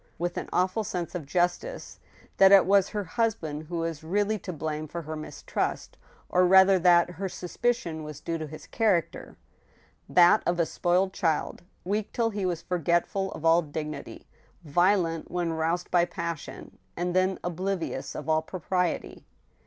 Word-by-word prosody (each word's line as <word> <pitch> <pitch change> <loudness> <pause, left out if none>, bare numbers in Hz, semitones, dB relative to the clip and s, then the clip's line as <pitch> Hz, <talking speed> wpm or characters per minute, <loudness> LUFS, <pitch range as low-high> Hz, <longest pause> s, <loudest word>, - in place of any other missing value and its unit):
with 175 +1 -2
an - - -5
awful 185 +4 +1
sense 180 -3 -4
of 165 -6 -5
justice, 180 - -2 0.4
that 195 0 +7
it 195 -2 +8
was 195 0 +4
her 210 -2 -3
husband 165 -7 -2
who 170 +1 -4
was 165 -2 -3
really 205 +5 0
to 185 - -6
blame 155 -1 -4
for 170 +3 -6
her 155 +1 -5
mistrust, 155 0 -4 0.3
or 180 - +3
rather 190 +1 +6
that 175 0 +5
her 190 +2 -4
suspicion 180 -2 -2
was 150 -1 -8
due 165 +1 -3
to 155 - -5
his 155 +1 -10
character— 190 -8 -1 0.7
that 175 +4 +6
of 175 0 +1
a 170 - +3
spoiled 180 +4 +1
child, 160 -5 -1 0.2
weak 205 +3 -2
till 230 -1 +1
he 200 -3 -2
was 175 -3 -3
forgetful 180 +2 0
of 160 - -7
all 165 +1 +5
dignity, 150 -1 -7 0.4
violent 170 +1 +1
when 175 -2 -1
roused 165 +2 -1
by 175 -1 +4
passion, 170 -3 -6 0.2
and 175 +1 -2
then 185 0 +2
oblivious 180 +1 -3
of 150 - -6
all 155 0 +3
propriety. 180 +1 -3
175 Hz, 160 wpm, -27 LUFS, 165-190 Hz, 0.7 s, it